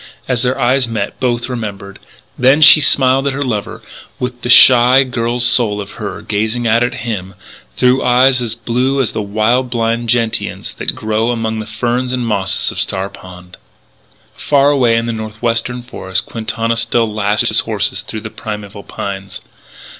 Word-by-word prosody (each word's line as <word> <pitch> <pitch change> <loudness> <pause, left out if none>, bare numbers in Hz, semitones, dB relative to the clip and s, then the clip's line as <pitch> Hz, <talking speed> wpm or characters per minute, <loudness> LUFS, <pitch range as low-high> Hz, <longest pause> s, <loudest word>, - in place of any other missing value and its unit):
As 125 -3 0
their 130 +1 -1
eyes 130 0 +2
met 110 -3 -4
both 120 -2 -1
remembered. 100 -5 -6 0.4
Then 130 +4 +3
she 155 +1 +9
smiled 135 0 +3
at 140 - 0
her 140 +1 -2
lover 110 -6 -4 0.3
with 125 -1 -5
the 120 - -4
shy 125 +1 +7
girl's 120 -1 0
soul 110 -4 +3
of 100 0 -7
her - - -6
gazing 110 +4 -2
out 115 +1 +2
at 120 - -2
him 95 -5 -5 0.4
through 125 +1 +2
eyes 125 +1 +3
as 115 -2 -3
blue 125 +4 -1
as 130 - 0
the - - -3
wild 110 +5 0
blind 115 0 -1
gentians 115 -2 -1
that - - -2
grow 110 +2 -1
among 110 -2 -2
the 110 - -6
ferns 125 +1 -2
and 125 -1 -2
mosses 105 -4 -1
of - - -6
Star 95 0 -1
Pond. 90 -2 -13 0.8
Far 145 0 +2
away 125 -5 +2
in 115 0 0
the 115 - -3
northwestern 115 +3 -3
forests 95 -6 -3
Quintana 115 0 -3
still 115 0 +1
lashed 105 0 0
his - - +2
horses - - -2
through 110 - -7
the 110 0 -8
primeval 105 -1 -7
pines. 100 -1 -7
115 Hz, 170 wpm, -15 LUFS, 110-125 Hz, 0.8 s, she